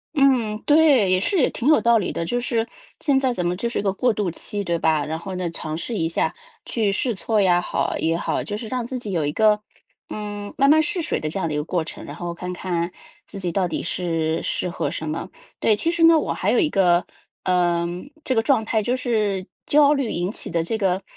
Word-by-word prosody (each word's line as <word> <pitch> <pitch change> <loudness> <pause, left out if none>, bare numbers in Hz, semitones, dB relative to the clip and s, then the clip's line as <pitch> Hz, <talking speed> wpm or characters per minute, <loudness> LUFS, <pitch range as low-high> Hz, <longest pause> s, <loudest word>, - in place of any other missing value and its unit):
嗯， 255 -7 +3
对， 290 -10 +5
也 185 - +4
是 375 - 0
也 270 - +4
挺 250 - -3
有 310 - +6
道 235 -1 +4
理 190 - -2
的， 170 - -3
就 245 +7 -1
是 230 -2 -1 0.3
现 280 -3 +2
在 260 -2 +1
怎 180 -7 -2
么， 175 +1 0
就 235 +5 -2
是 235 - -3
一 - - +1
个 195 -2 0
过 245 +5 +2
渡 205 -5 -1
期， 205 +4 -4
对 170 -2 0
吧。 155 -2 +1
然 160 +1 -3
后 185 +2 -6
呢， 180 -1 -2
尝 155 -1 -4
试 225 +7 -4
一 165 -3 0
下， - - 0 0.3
去 215 -4 0
试 235 +4 0
错 215 +2 0
呀 180 -3 +4
好 - - -1
也 165 +1 +1
好， - - -1
就 205 0 -4
是 225 - -6
让 250 0 -2
自 255 +2 -4
己 220 -5 -6
有 165 -5 0
一 145 - 0
个， 210 +3 +3 0.5
嗯， 205 -1 -5
慢 275 - +4
慢 315 +1 +6
试 335 +3 -1
水 325 - -1
的 155 - -3
这 180 - -5
样 165 - -1
的 155 - -3
一 - - -1
个 150 - -1
过 170 +1 -1
程， - - -8
然 145 - -8
后 175 0 -4
看 180 +1 -6
看 175 -1 -2 0.4
自 195 - -8
己 180 -2 -2
到 185 -1 +1
底 160 - -3
是 165 -2 -1
适 - - -2
合 170 - -2
什 160 - -5
么。 160 +4 -4 0.3
对， 220 - +3
其 330 +11 0
实 340 -1 +1
呢， 330 0 +8
我 - - -1
还 - - -1
有 - - +3
一 320 - +2
个， 180 -2 +3 0.4
呃， 175 -2 +2 0.4
这 260 - 0
个 225 - +3
状 225 -3 +2
态， 220 -1 +1
就 245 +4 0
是 210 -7 0 0.2
焦 295 0 +5
虑 275 -5 -1
引 175 +3 -1
起 - - -6
的 165 -1 0
这 200 +7 -2
个 190 -1 +1
200 Hz, 270 characters per minute, -23 LUFS, 175-245 Hz, 0.5 s, 呢